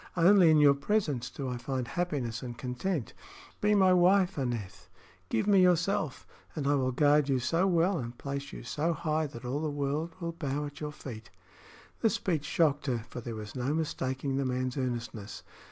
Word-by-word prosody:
Only 180 Hz, 0 st, +6 dB
in 155 Hz, -, +6 dB
your 145 Hz, -1 st, +7 dB
presence 140 Hz, -, -1 dB
do 135 Hz, -, -5 dB
I 125 Hz, -1 st, -3 dB
find 130 Hz, 0 st, -3 dB
happiness 145 Hz, -10 st, -2 dB
and 120 Hz, -2 st, -7 dB
content. 125 Hz, -, -3 dB, 0.5 s
Be 210 Hz, 0 st, +3 dB
my 190 Hz, -2 st, +5 dB
wife, 185 Hz, +1 st, +4 dB
Aneth; 120 Hz, -8 st, -4 dB, 0.4 s
give 110 Hz, -, 0 dB
me 200 Hz, -2 st, +5 dB
yourself, 175 Hz, -4 st, +1 dB, 0.3 s
and 150 Hz, -3 st, -3 dB
I 145 Hz, -, +3 dB
will 130 Hz, -2 st, +1 dB
guard 145 Hz, +2 st, +3 dB
you 135 Hz, -, +3 dB
so 165 Hz, +9 st, +1 dB
well 175 Hz, 0 st, +2 dB
and 120 Hz, 0 st, -6 dB
place 140 Hz, 0 st, -5 dB
you -, -, -8 dB
so 155 Hz, +7 st, -1 dB
high 155 Hz, -1 st, -1 dB
that 120 Hz, -3 st, -10 dB
all 130 Hz, +4 st, -1 dB
the 155 Hz, -, -1 dB
world 145 Hz, +3 st, -2 dB
will 170 Hz, -1 st, -3 dB
bow 150 Hz, -3 st, -3 dB
at 145 Hz, +1 st, -9 dB
your 150 Hz, 0 st, -3 dB
feet." 115 Hz, -6 st, -9 dB, 0.7 s
The 225 Hz, -, +3 dB
speech 165 Hz, -7 st, -1 dB
shocked 150 Hz, -2 st, +1 dB
her, 120 Hz, -4 st, -1 dB
for 120 Hz, -, -6 dB
there 115 Hz, -1 st, -6 dB
was 105 Hz, -1 st, -7 dB
no 130 Hz, +4 st, -1 dB
mistaking 135 Hz, -3 st, -2 dB
the 140 Hz, -, +1 dB
man's 130 Hz, 0 st, -1 dB
earnestness. 120 Hz, -5 st, -4 dB
145 Hz, 190 wpm, -30 LUFS, 125-170 Hz, 0.7 s, your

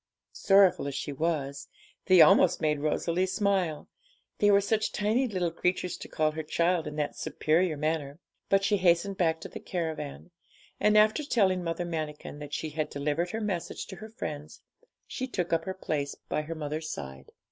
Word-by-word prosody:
Sorrowful 195 Hz, -6 st, +4 dB
as 140 Hz, -, -4 dB
she 145 Hz, -, -4 dB
was, 140 Hz, -2 st, -2 dB, 0.4 s
they 185 Hz, -2 st, +7 dB
almost 180 Hz, +2 st, +6 dB
made 150 Hz, -1 st, +1 dB
Rosalie 170 Hz, +4 st, 0 dB
smile, 185 Hz, -5 st, 0 dB, 0.5 s
they 205 Hz, -, +4 dB
were 200 Hz, -1 st, +6 dB
such 215 Hz, +2 st, 0 dB
tiny 220 Hz, +6 st, +1 dB
little 180 Hz, -6 st, -1 dB
creatures 180 Hz, +1 st, -1 dB
to -, -, -9 dB
call 155 Hz, 0 st, 0 dB
her 160 Hz, +1 st, -4 dB
'child' 170 Hz, +1 st, 0 dB
in 150 Hz, -, -6 dB
that 150 Hz, -1 st, -2 dB
superior 160 Hz, 0 st, 0 dB
manner. 150 Hz, -2 st, -2 dB, 0.3 s
But 195 Hz, 0 st, +3 dB
she 205 Hz, +1 st, +2 dB
hastened 185 Hz, +1 st, +2 dB
back 165 Hz, -2 st, +1 dB
to -, -, -6 dB
the -, -, -8 dB
caravan, 160 Hz, -2 st, -5 dB, 0.5 s
and 210 Hz, 0 st, +4 dB
after 215 Hz, +7 st, +4 dB
telling 190 Hz, -10 st, +2 dB
Mother 170 Hz, +1 st, -2 dB
Manikin 155 Hz, -3 st, -5 dB
that 145 Hz, -1 st, -8 dB
she 155 Hz, -, -4 dB
had 155 Hz, 0 st, -2 dB
delivered 150 Hz, +5 st, -1 dB
her 220 Hz, +3 st, -4 dB
message 190 Hz, -5 st, -3 dB
to 190 Hz, -, -8 dB
her 215 Hz, +4 st, -9 dB
friends, 155 Hz, -, -7 dB, 0.4 s
she 260 Hz, -, -4 dB
took 180 Hz, -9 st, -2 dB
up 165 Hz, 0 st, +1 dB
her 190 Hz, -, -4 dB
place 145 Hz, -6 st, -3 dB
by 150 Hz, -, -3 dB
her 160 Hz, +2 st, -6 dB
mother's 155 Hz, +1 st, -4 dB
side. 70 Hz, -, -8 dB
170 Hz, 180 wpm, -28 LUFS, 150-190 Hz, 0.5 s, they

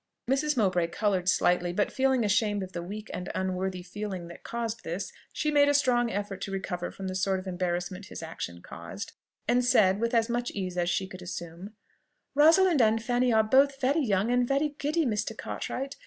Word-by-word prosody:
Mrs. 280 Hz, +2 st, +1 dB
Mowbray 185 Hz, -6 st, +2 dB
coloured 185 Hz, 0 st, 0 dB
slightly; 175 Hz, -1 st, +2 dB
but 205 Hz, +4 st, 0 dB
feeling 260 Hz, -3 st, +2 dB
ashamed 205 Hz, -1 st, +1 dB
of 185 Hz, -, -8 dB
the 175 Hz, -, -4 dB
weak 210 Hz, +5 st, -7 dB
and 180 Hz, -, -5 dB
unworthy 185 Hz, 0 st, -2 dB
feeling 190 Hz, -2 st, -5 dB
that 170 Hz, -, -11 dB
caused 230 Hz, -1 st, -4 dB
this, 175 Hz, +4 st, -4 dB, 0.2 s
she 305 Hz, -, -1 dB
made 285 Hz, -1 st, +5 dB
a 290 Hz, -, +3 dB
strong 245 Hz, -4 st, +3 dB
effort 200 Hz, -2 st, -4 dB
to 195 Hz, -, -4 dB
recover 190 Hz, -2 st, -3 dB
from 195 Hz, -, -7 dB
the 185 Hz, -, -3 dB
sort 190 Hz, +1 st, +1 dB
of 185 Hz, -, -9 dB
embarrassment 180 Hz, +1 st, -3 dB
his -, -, -8 dB
action 85 Hz, -, -6 dB
caused, 85 Hz, +4 st, -8 dB, 0.4 s
and 245 Hz, +2 st, +3 dB
said, 200 Hz, -5 st, +4 dB
with 235 Hz, +1 st, 0 dB
as 225 Hz, -1 st, +3 dB
much 240 Hz, 0 st, -1 dB
ease 185 Hz, -3 st, -3 dB
as 175 Hz, -1 st, 0 dB
she 190 Hz, +2 st, 0 dB
could 185 Hz, 0 st, -10 dB
assume, 180 Hz, +3 st, -7 dB, 0.6 s
"Rosalind 320 Hz, +2 st, +5 dB
and 225 Hz, 0 st, +3 dB
Fanny 245 Hz, +1 st, +2 dB
are 220 Hz, -1 st, +5 dB
both 270 Hz, +4 st, +4 dB
very 280 Hz, +4 st, +2 dB
young 205 Hz, -1 st, +1 dB
and 245 Hz, 0 st, +2 dB
very 280 Hz, +3 st, +1 dB
giddy, 310 Hz, +3 st, +1 dB
Mr. 215 Hz, -4 st, -2 dB
Cartwright. 270 Hz, +2 st, -4 dB
205 Hz, 200 wpm, -28 LUFS, 185-245 Hz, 0.6 s, made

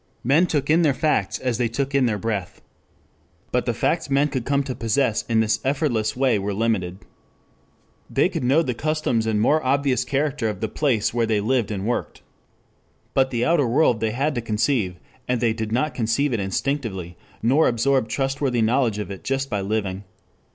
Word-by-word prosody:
Men 150 Hz, +9 st, +4 dB
took 145 Hz, -4 st, -1 dB
in 165 Hz, +2 st, +5 dB
their 145 Hz, -5 st, +3 dB
facts 125 Hz, -8 st, 0 dB
as 125 Hz, -3 st, -2 dB
they 120 Hz, -, +2 dB
took 135 Hz, +4 st, -3 dB
in 135 Hz, -2 st, +3 dB
their 110 Hz, -2 st, 0 dB
breath. 100 Hz, -3 st, -3 dB
3 -, -, -25 dB, 0.9 s
But -, -, 0 dB
the -, -, +1 dB
facts -, -, 0 dB
men 140 Hz, +2 st, +2 dB
could 130 Hz, -4 st, -3 dB
come 140 Hz, 0 st, +1 dB
to 135 Hz, -, -4 dB
possess 115 Hz, 0 st, 0 dB
in 115 Hz, -1 st, +3 dB
this 110 Hz, 0 st, +1 dB
effortless 130 Hz, -6 st, 0 dB
way 130 Hz, -4 st, +2 dB
were 100 Hz, 0 st, -3 dB
limited. 95 Hz, -5 st, -1 dB, 1.0 s
They -, -, +2 dB
could -, -, -4 dB
know 140 Hz, +7 st, +3 dB
the 125 Hz, -, -2 dB
customs 145 Hz, -5 st, -1 dB
and 110 Hz, -1 st, +1 dB
more 150 Hz, +8 st, +3 dB
obvious 135 Hz, 0 st, +1 dB
character 135 Hz, -5 st, -1 dB
of 105 Hz, -3 st, -5 dB
the 110 Hz, -, -1 dB
place 120 Hz, -8 st, 0 dB
where 120 Hz, -1 st, +1 dB
they 110 Hz, -2 st, +1 dB
lived 115 Hz, +1 st, 0 dB
and 100 Hz, -2 st, -3 dB
worked. 120 Hz, +2 st, -3 dB, 0.9 s
But 130 Hz, 0 st, +3 dB
the 120 Hz, -2 st, -1 dB
outer 160 Hz, -6 st, +3 dB
world 125 Hz, -2 st, +3 dB
they 110 Hz, 0 st, 0 dB
had 135 Hz, +7 st, -1 dB
to 120 Hz, -, -2 dB
conceive, 110 Hz, -3 st, 0 dB, 0.3 s
and 125 Hz, -1 st, 0 dB
they 115 Hz, -2 st, +2 dB
did 110 Hz, -1 st, -4 dB
not 130 Hz, +5 st, 0 dB
conceive 125 Hz, +4 st, 0 dB
it 115 Hz, -, 0 dB
instinctively, 95 Hz, -, -3 dB, 0.3 s
nor 135 Hz, +7 st, +4 dB
absorb 125 Hz, +1 st, +1 dB
trustworthy 135 Hz, -3 st, 0 dB
knowledge 115 Hz, -1 st, +1 dB
of 105 Hz, -1 st, -5 dB
it 95 Hz, -, -8 dB
just 135 Hz, +1 st, -2 dB
by 100 Hz, -, -1 dB
living. 100 Hz, -1 st, -2 dB
120 Hz, 195 wpm, -23 LUFS, 110-140 Hz, 1.0 s, in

